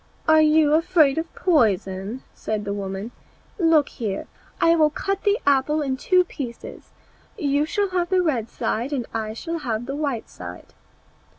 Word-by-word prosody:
"Are 315 0 +6
you 305 -1 +4
afraid 320 -3 +3
of 325 0 -5
poison?" 210 - +1
said 215 -1 -4
the 200 - -2
woman, 200 +2 -5 0.5
"look 325 -4 +4
here, 205 -5 -4 0.3
I 335 0 +5
will 310 -2 +4
cut 390 +5 -3
the 410 +1 +4
apple 285 +2 +2
in 265 -2 -1
two 365 +7 +3
pieces; 260 -9 -8 0.5
you 290 -4 +1
shall 405 +2 0
have 360 -2 -1
the 370 -1 +3
red 245 -9 -1
side, 240 +6 -2 0.2
I 220 -1 -3
will 335 0 -2
have 240 -5 -3
the 275 +2 -4
white 285 -6 -2
one." 90 0 -8
285 Hz, 160 wpm, -23 LUFS, 225-330 Hz, 0.5 s, Are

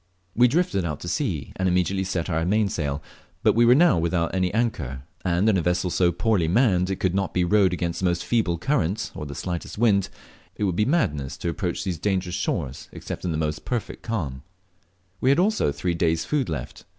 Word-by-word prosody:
We 120 +2 +6
drifted 125 - +1
out 75 -4 -3
to - - -6
sea, 85 - -2
and 95 0 +1
immediately 90 +2 +1
set 90 -3 -2
our 80 -2 0
mainsail, 85 -7 0 0.4
but - - +5
we 120 +1 +4
were 120 +1 +7
now 165 - +5
without 85 0 0
any 90 -1 +1
anchor, 80 - -2 0.2
and 90 +4 +1
in 105 -3 +4
a - - +1
vessel 90 +1 0
so 90 0 +3
poorly 90 0 +1
manned 90 -2 +3
that 95 - -1
it - - -7
could 95 -2 +1
not 100 0 -1
be 90 - +3
rowed 95 0 +4
against 85 -2 -2
the 95 - -1
most 85 -1 0
feeble 105 -8 +1
current 105 - -1
or 75 - -6
the 70 - -7
slightest 90 +1 -5
wind, 100 -4 +3 0.5
it - - -3
word 95 -4 +1
be 105 - +2
madness 75 - 0
to 85 - -3
approach 85 +1 -2
these 90 -5 -3
dangerous 95 -1 -1
shores 75 -7 -3
except - - -7
in 90 - 0
the 80 - -1
most 75 -1 -2
perfect 120 -3 -4
calm. 85 - -3 0.8
We 130 - +2
had 140 - +4
also 210 +5 +2
only 70 0 -1
three 90 +3 0
days' 80 -1 +1
food 140 - 0
left. 75 -7 -5
90 Hz, 220 wpm, -24 LUFS, 85-105 Hz, 0.8 s, were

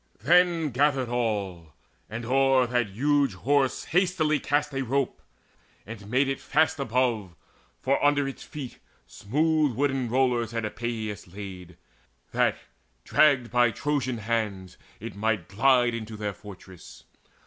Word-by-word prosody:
Then 170 0 +3
gathered 135 -1 +1
all, 100 -9 -2 0.4
And 115 +2 -6
o'er 135 +1 +3
that 120 -1 0
huge 140 +2 +1
Horse 135 +5 +1
hastily 170 -4 +1
cast 145 +1 0
a 135 - -1
rope, 135 +1 -1 0.6
And 105 -2 -10
made 130 +4 +2
it 135 0 -2
fast 155 -1 +1
above; 120 -7 -1 0.5
for 135 +1 +1
under 145 -1 +3
its 135 - -7
feet 140 -5 -8 0.3
Smooth 150 - 0
wooden 135 -2 0
rollers 120 -2 +1
had 115 -1 -2
Epeius 110 -3 -4
laid, 90 -2 -9 0.5
That, - - +1 0.5
dragged 135 - +3
by 120 -1 +4
Trojan 130 -1 -2
hands, 105 -4 -3 0.2
it 115 0 -7
might 105 -4 -1
glide 120 +3 +3
on 115 - -2
Into 110 -1 -8
their 105 -1 -3
fortress. 95 -3 -13
120 Hz, 135 wpm, -26 LUFS, 110-140 Hz, 0.6 s, by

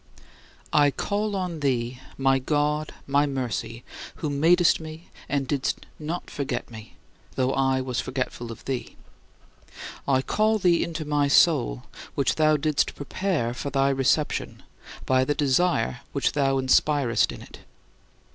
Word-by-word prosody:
I 145 -1 +5
call 205 +7 -2
on 180 -4 -3
thee, 125 -3 -1 0.2
my 135 0 +3
God, 150 +2 0
my 140 +1 +2
Mercy, 120 -3 -4 0.3
who 150 -3 -3
madest 165 +5 +4
me 160 +1 -10 0.2
and 140 -2 0
didst 135 -1 -2
not 160 +3 -4
forget 140 -3 -4
me, 110 -1 -11 0.4
though 130 0 +1
I 135 -1 +1
was 125 -2 -3
forgetful 125 -2 -4
of 115 - -11
thee. 130 -2 -4 1.1
I 130 -1 +2
call 215 +6 +2
thee 175 -4 +3
into 160 -2 -4
my 145 -1 +1
soul, 140 - +3 0.3
which 140 - +2
thou 155 -1 +3
didst 150 0 0
prepare 145 -5 -2
for 140 - -4
thy 135 0 +2
reception 135 +3 0 0.4
by 130 0 +3
the 145 +3 0
desire 140 - +1
which - - +1
thou 135 -2 +1
inspirest 135 -1 +2
in - - -9
it. - - -13
140 Hz, 140 wpm, -25 LUFS, 130-155 Hz, 1.1 s, I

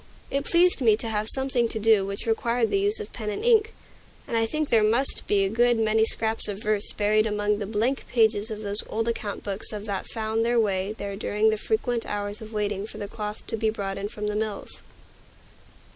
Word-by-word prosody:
It 280 +1 -1
pleased 350 -3 +4
me 225 -3 +5
much 210 - -1
to 230 - -3
have 215 -1 -1
something 265 -3 +2
to 225 - -2
do 220 -2 +4
which 200 0 -5
required 230 +1 0
the 395 - +2
use 410 +3 0
of 430 - -8
pen 215 -3 -4
and 210 - -4
ink, 445 -2 +4 0.6
and - - -3
I 225 0 +2
think 305 +4 -2
there 225 - +4
must 230 +6 +2
be 200 -1 +2
a - - -1
good 240 +2 +2
many 220 0 +2
scraps 225 0 +4
of 205 -1 -4
verse 210 -1 0
buried 215 +1 +2
among 210 0 0
the 205 - -4
blank 225 +6 -1
pages 220 -2 +2
of 215 -1 -6
those 205 0 -1
old 225 +1 -2
account 215 -3 -3
books 200 0 -5
of 210 -1 -6
that 200 -2 -4
found 220 0 -2
their 235 +1 +2
way 195 -2 0
there 200 -2 -6
during 210 +2 +1
the - - +1
frequent 245 - -1
half - - -4
hours 205 +2 -5
of 220 0 -9
waiting 205 -1 -2
for 215 - -10
the 205 -1 -5
cloth 210 0 -6
to - - -3
be 220 0 0
brought 195 -2 -4
in 200 - -3
from 210 -1 -6
the 210 0 -2
mills. 215 -1 -4
220 Hz, 235 wpm, -25 LUFS, 210-235 Hz, 0.6 s, me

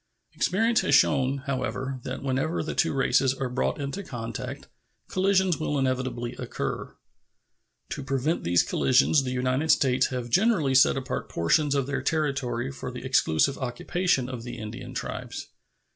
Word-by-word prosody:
Experience 225 +5 +2
has - - +3
shown, 135 -1 +3
however, 130 -1 -3
that 130 +2 -6
whenever 135 +6 -1
the 155 - -4
two - - +1
races 135 -1 +2
are 130 -1 -3
brought 125 - -1
into 140 +7 -4
contact 115 - -6 0.4
collisions 190 -2 +2
will 150 -2 -1
inevitably 130 -2 -1
occur. - - -4 0.9
To 140 - -5
prevent 135 +4 -1
these 85 0 +3
collisions 130 +3 +3
the 130 - -3
United 130 +4 0
States 130 -3 +4
have 125 -2 -5
generally 185 - +3
set 130 +1 +5
apart 130 -1 -4
portions 145 - +2
of 140 -2 +1
their 135 -1 -2
territory 135 -4 -1
for 130 - -6
the 125 +1 -8
exclusive 130 - +2
occupation 130 +3 0
of 130 -2 -6
the 120 +1 -7
Indian 110 -2 -7
tribes. - - -5
135 Hz, 150 wpm, -26 LUFS, 125-150 Hz, 0.9 s, set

